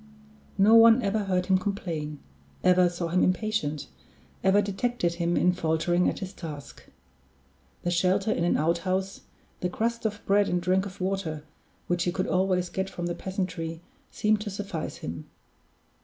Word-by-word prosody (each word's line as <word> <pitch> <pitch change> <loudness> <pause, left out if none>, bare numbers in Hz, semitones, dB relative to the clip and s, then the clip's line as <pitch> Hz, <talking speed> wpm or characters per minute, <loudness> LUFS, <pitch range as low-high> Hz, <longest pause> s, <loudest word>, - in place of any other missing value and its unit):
No 205 +3 +5
one 230 +1 +7
ever 200 +1 0
heard 185 -2 0
him 190 -1 +3
complain, 165 -7 -3 0.5
ever 180 -1 +5
saw 175 -1 -4
him 180 +2 +2
impatient, 185 -6 0 0.6
ever 190 +1 +5
detected 205 -2 -1
him 170 0 +1
in 180 - +3
faltering 175 +1 +1
at - - -4
his 190 -1 -6
task. 150 -5 -9 1.0
The 175 - 0
shelter 185 +4 +2
in 170 - 0
an 175 - +2
outhouse, 185 +4 -1 0.4
the 180 - -1
crust 230 +3 -1
of 210 -1 -7
bread 200 +1 +3
and 180 - +1
drink 185 +2 +1
of 190 -1 -11
water, 185 -5 -2 0.4
which 175 0 0
he 175 - +1
could 185 +1 -1
always 185 -1 +1
get 190 +2 -3
from 175 -2 -5
the 175 - -1
peasantry, 175 -3 -4 0.3
seemed 215 0 +1
to 210 - -4
suffice 195 -5 -5
him. 80 -1 -7
185 Hz, 160 wpm, -27 LUFS, 170-200 Hz, 1.0 s, one